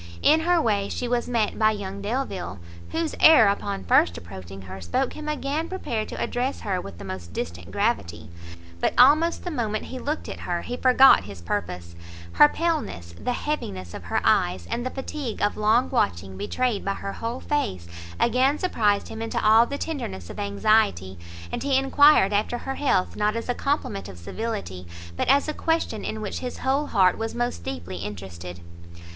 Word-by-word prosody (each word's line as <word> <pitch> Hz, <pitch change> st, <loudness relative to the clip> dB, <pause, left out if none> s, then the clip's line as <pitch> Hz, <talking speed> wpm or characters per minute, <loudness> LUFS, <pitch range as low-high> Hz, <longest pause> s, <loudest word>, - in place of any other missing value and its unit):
In 310 Hz, +2 st, +6 dB
her 345 Hz, +2 st, +3 dB
way 205 Hz, -8 st, +1 dB
she 245 Hz, -, -3 dB
was 240 Hz, 0 st, 0 dB
met 230 Hz, -4 st, 0 dB
by 215 Hz, -1 st, +5 dB
young 200 Hz, -2 st, -4 dB
Delvile, 200 Hz, -, -3 dB, 0.3 s
whose 325 Hz, -1 st, -2 dB
air 315 Hz, -9 st, +8 dB
upon 200 Hz, -, -1 dB
first 85 Hz, -1 st, +3 dB
approaching 95 Hz, +3 st, -9 dB
her 95 Hz, 0 st, -9 dB
spoke 85 Hz, -1 st, -1 dB
him 305 Hz, 0 st, -6 dB
again 300 Hz, +2 st, -2 dB
prepared 235 Hz, -13 st, -3 dB
to -, -, -6 dB
address 255 Hz, +3 st, -2 dB
her 190 Hz, -4 st, -1 dB
with 100 Hz, -3 st, -10 dB
the -, -, -9 dB
most 95 Hz, -2 st, -7 dB
distant 85 Hz, 0 st, -5 dB
gravity; 85 Hz, -, -1 dB, 0.5 s
but -, -, 0 dB
almost 305 Hz, +7 st, +5 dB
the 355 Hz, -, -4 dB
moment 220 Hz, -7 st, -2 dB
he 260 Hz, -, -7 dB
looked 295 Hz, +4 st, -3 dB
at -, -, -6 dB
her, 175 Hz, -1 st, -3 dB
he 245 Hz, -, -4 dB
forgot 255 Hz, -, +6 dB
his 100 Hz, -3 st, -9 dB
purpose; 85 Hz, -1 st, -4 dB, 0.4 s
her 150 Hz, +13 st, +7 dB
paleness, 290 Hz, -, -2 dB
the 250 Hz, -, -1 dB
heaviness 95 Hz, -, -4 dB
of -, -, -8 dB
her -, -, 0 dB
eyes, 90 Hz, 0 st, +2 dB
and 240 Hz, -, -1 dB
the 255 Hz, -, -2 dB
fatigue 265 Hz, -2 st, -5 dB
of 205 Hz, -, +1 dB
long 220 Hz, +4 st, +3 dB
watching 95 Hz, -, 0 dB
betrayed 205 Hz, -, -1 dB
by 195 Hz, 0 st, -1 dB
her 195 Hz, -, -5 dB
whole 230 Hz, +2 st, -4 dB
face, 95 Hz, -, -2 dB, 0.3 s
again, 255 Hz, +5 st, +3 dB
surprised 210 Hz, -, +1 dB
him 220 Hz, -, -7 dB
into 225 Hz, -, -2 dB
all 220 Hz, +2 st, +6 dB
the 280 Hz, -, -4 dB
tenderness 95 Hz, -, -5 dB
of -, -, -9 dB
anxiety, 100 Hz, -, +1 dB, 0.3 s
and -, -, -3 dB
he 275 Hz, -2 st, +2 dB
enquired 270 Hz, -6 st, +5 dB
after 210 Hz, +4 st, 0 dB
her 270 Hz, -, -4 dB
health 260 Hz, -10 st, 0 dB
not 210 Hz, +1 st, +1 dB
as 230 Hz, -, -4 dB
a 245 Hz, -, +1 dB
compliment 255 Hz, -, -2 dB
of 95 Hz, -, -10 dB
civility, 90 Hz, -, -5 dB, 0.3 s
but -, -, -1 dB
as 280 Hz, +3 st, +4 dB
a 305 Hz, -, -2 dB
question 325 Hz, -11 st, -1 dB
in 220 Hz, -, -4 dB
which 210 Hz, -, -4 dB
his 250 Hz, -1 st, -5 dB
whole 275 Hz, +3 st, 0 dB
heart 190 Hz, -5 st, +3 dB
was 225 Hz, 0 st, -3 dB
most 240 Hz, -, -2 dB
deeply 90 Hz, +1 st, -5 dB
interested. 90 Hz, -2 st, -7 dB
215 Hz, 185 wpm, -25 LUFS, -, 0.5 s, air